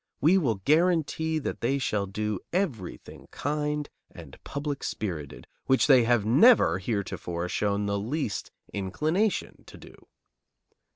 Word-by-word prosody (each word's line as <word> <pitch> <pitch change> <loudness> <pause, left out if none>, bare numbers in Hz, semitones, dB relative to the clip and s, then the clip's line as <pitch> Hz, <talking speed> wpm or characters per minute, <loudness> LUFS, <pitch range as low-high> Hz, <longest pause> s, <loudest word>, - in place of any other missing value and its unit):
We 160 +7 +4
will 125 -10 +1
guarantee 160 0 +2
that 155 - -4
they 130 +4 +1
shall 105 -7 -1
do 105 0 -3
everything 145 - -4
kind 150 0 -2 0.2
and - - -13
public 140 0 -4
spirited, 80 -9 -5 0.2
which 130 - +4
they 130 -5 +6
have 120 -3 +2
never 125 - +5
heretofore 90 -4 -3
shown 100 +2 -1
the 100 0 -1
least 120 +1 -3 0.2
inclination 155 - -1
to - - -12
do." - - -16
125 Hz, 125 wpm, -27 LUFS, 100-150 Hz, 0.2 s, they